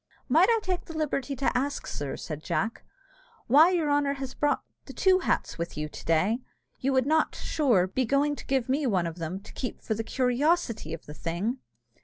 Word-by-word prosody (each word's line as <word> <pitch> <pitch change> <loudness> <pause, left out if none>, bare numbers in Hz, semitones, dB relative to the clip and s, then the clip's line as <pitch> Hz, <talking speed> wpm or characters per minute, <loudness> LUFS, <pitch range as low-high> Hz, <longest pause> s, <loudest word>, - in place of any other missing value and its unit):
"Might - - +5
I 460 - +5
take 365 -1 -2
the 325 - -7
liberty 280 -3 -1
to 265 0 0
ask, 280 +3 -1
sir," 145 -2 -4
said 155 -2 -6
Jack, 225 +7 -2 0.6
"why 300 +8 +7
your 330 -5 +1
honour 285 -1 +2
has 270 -2 -6
brought 290 0 0 0.2
the - - -9
two 375 -1 +4
hats 360 - -1
with 170 -2 -4
you 150 0 -2
to - - -10
day? 185 +9 +2 0.4
You 270 - 0
would 260 -1 +3
not, 315 +2 +2
sure, 245 - +2
be 190 +8 -1
going 285 +4 +2
to - - -9
give 265 -3 +1
me 275 +2 +1
one 185 -6 +1
of 165 0 -5
them, 165 +3 -3
to 210 - -13
keep 250 - -4
for 220 - -1
the 225 +1 -3
curiosity 250 - +1
of 165 - -15
the 150 - -9
thing?" 175 - -2
260 Hz, 210 wpm, -28 LUFS, 190-290 Hz, 0.6 s, why